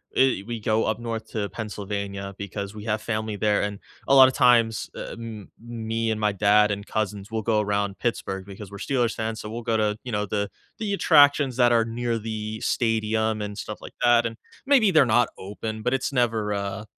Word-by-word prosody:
eh 130 -7 +3
we 120 -1 -4
go 110 +1 +1
up 110 +1 -1
north 115 -1 -4
to 105 -3 -2
Pennsylvania 100 -2 -5
because 100 +1 -6
we 105 - -8
have 110 -1 -1
family 110 -2 -3
there, 105 0 +2
and 100 -1 -3 0.3
a - - +4
lot 135 -1 +9
of 130 - -1
times, 115 -3 +3
eh - - -6
m 115 -3 -8
me 115 -1 -3
and 110 - -2
my 105 -1 +2
dad 105 +1 +4
and 100 0 -3
cousins 105 -1 -3
will 110 - -1
go 110 0 +1
around 100 -2 -1
Pittsburgh 95 -5 -3
because 100 0 -10
we're 100 - -9
Steelers 120 +1 0
fans, 110 0 -3
so 105 - -7
we'll 115 +2 -5
go 115 0 +1
to, 105 -1 0
you 125 - -6
know, 105 -1 0
the 100 0 -2 0.3
the 210 -2 -2
attractions 145 -7 +5
that 120 -1 +5
are 115 -1 +4
near 115 0 -2
the 110 0 -5
stadium 110 -1 0
and 105 0 -5
stuff 105 - -6
like - - -10
that, 120 -1 +5
and 115 - -7 0.3
maybe 260 -7 +5
they're 155 -6 +6
not 120 +1 +3
open, 110 +3 -6
but 125 +3 0
it's 135 +1 -1
never 115 -4 +1
a 100 +1 -3
110 Hz, 210 wpm, -25 LUFS, 105-115 Hz, 0.3 s, lot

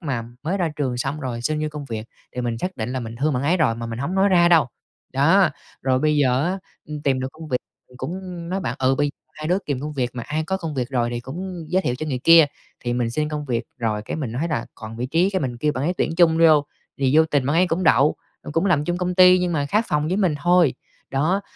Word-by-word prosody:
mà 135 -8 -2 0.2
mới 175 +6 -1
ra 175 -3 +1
trường 130 -4 -1
xong 140 +5 -3
rồi 120 -3 -4
xin 155 +3 -1
vô 155 - 0
công 150 -1 -7
việc 115 -3 -5 0.3
thì 125 - -3
mình 120 -2 -2
xác 185 +7 -4
định 110 -1 -3
là 130 - -2
mình 115 -1 -7
thương 150 +3 +1
bạn 125 +1 -1
ấy 170 +6 +2
rồi 145 -9 +2
mà 115 0 -5
mình 115 0 -5
hổng 160 +8 -2
nói 195 +1 +4
ra 175 -2 +5
đâu. 165 -7 +5 0.5
Đó, - - +4 0.3
rồi 130 -1 +2
bây 150 +1 +2
giờ 130 -1 +2
á, 185 +3 -1 0.3
ừm, 150 -1 -6
tìm 130 -2 +1
được 130 - -2
công 160 0 -10
việc 125 - 0 0.4
cũng 180 +2 -6
nói 190 +2 -2
bạn: 125 -7 -2
"Ừ, 130 0 +3
bây 145 +1 0 0.2
hai 155 +1 -5
đứa 180 - +3
kìm 140 -3 -2
công 150 +1 -4
việc 125 -4 -1
mà 125 - -5
ai 155 +6 -2
có 190 - 0
công 165 -5 -5
việc 125 -2 -2
rồi 120 -2 0
thì 120 0 -3
cũng 175 +6 -6
giới 185 +2 +1
thiệu 125 - 0
cho 155 - -4
người 130 -4 -2
kia." 165 -2 +8 0.4
Thì 120 - 0
mình 120 -1 0
xin 150 +4 -1
công 150 -1 -4
việc 120 -4 -1 0.2
rồi, 110 -3 -1
cái - - -5
mình 130 -8 -4
nói 145 +8 -1
rà: 150 - -1
"còn 110 0 -9
vị 125 +2 -2
trí" 170 +7 +2
cái, 190 - -1
mình 125 -3 -3
kêu 150 +4 +1
bạn 130 +1 -3
ấy 175 - 0
tuyển 160 - 0
chung 165 -2 +4
vô 155 -3 +6 0.3
thì 135 +2 +2
vô 160 - +7
tình 145 -4 0
bạn 150 +3 +1
ấy 180 +1 +4
cũng 175 +2 -1
đậu, 140 0 +4 0.3
ừm, 145 - -8
cũng 165 +5 +1
làm 150 -5 +2
chung 175 +2 -1
công 180 0 -1
ty 185 0 +7
nhưng 180 -1 0
mà 145 -3 0
khác 215 +9 +1
phòng 150 +1 0
với 185 - 0
mình 185 -7 +2
thôi. 175 -4 +4 0.4
Đó, 155 +9 +1
150 Hz, 280 wpm, -22 LUFS, 130-170 Hz, 0.5 s, kia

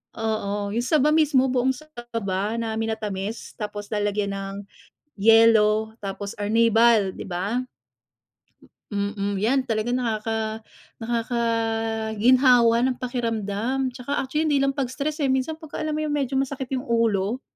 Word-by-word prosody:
Oo, 205 -2 -2
yung 235 +3 -1
saba 300 0 +3
mismo, 300 -4 +4
buong 260 +1 +1
saba 230 -8 -4
na 225 -1 -2
minatamis, 220 -1 -4
tapos 205 -1 -6
lalagyan 205 -1 -1
ng 195 0 -5 0.6
yelo, 220 0 +4
tapos, 200 -1 -6
arnibal, 225 0 +4
di - - -6
ba? 200 +8 -2 1.3
Mm, 200 0 -2
yan 240 +7 +2
talaga 220 +1 -1
nakaka 220 -2 -2 0.4
nakakaginhawa 230 +1 +2
ng 255 - -2
pakiramdam, 240 +1 -2
'tsaka 275 +3 -3
actually 300 +4 -1
hindi 290 -2 +3
lang 275 0 +1
pag 270 -3 -2
stress, 300 +3 -3
eh, 275 - +2
minsan 265 +4 0
pagka-alam 310 -1 -4
mo 310 - -1
yung 300 -1 -1
medyo 275 -2 -1
masakit 270 -1 -2
yung 255 - -3
ulo? 230 0 +1
230 Hz, 130 wpm, -24 LUFS, 210-255 Hz, 1.3 s, mismo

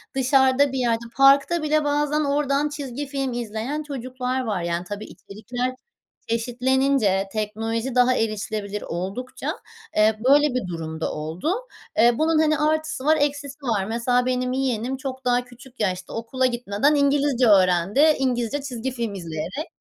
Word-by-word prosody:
dışarıda 265 +1 +3
bir 265 - -2
yerde 235 -1 0
parkta 280 +5 +5
bile 305 0 +2
bazen 295 +1 +1
oradan 285 0 +1
çizgi 290 -2 -5
film 270 -2 -2
izleyen 240 +6 -3
çocuklar 255 -2 -3
var 210 -6 -2
yani 170 0 -2
tabii 205 +3 -6
içerikler 245 +5 -5 0.5
eşitlenince, 245 -3 +1
teknoloji 225 +3 -2
daha 250 0 +4
erişilebilir 210 -1 -2
oldukça, 195 +9 -4 0.4
eee, 215 0 +4
böyle 290 +1 +6
bir 230 -7 -1
durumda 160 -2 -4
oldu, 160 - -2 0.4
eee, 240 +2 +6
bunun, 315 0 +3
hani, 310 -1 +3
artısı 310 -3 0
var 315 +1 +4
eksisi 290 0 -2
var 210 -5 0
mesela 240 +3 +1
benim 255 0 0
yeğenim 260 -1 -1
çok 260 -1 -6
daha 245 0 +2
küçük 250 +1 -16
yaşta 185 -3 -2
okula 255 +3 -1
gitmeden 240 +3 +1
İngilizce 280 -3 +2
öğrendi, 185 +1 +4 0.2
İngilizce 255 +1 0
çizgi 265 -2 -4
film 235 -4 -3
izleyerek 180 - -5
250 Hz, 140 wpm, -23 LUFS, 215-280 Hz, 0.5 s, böyle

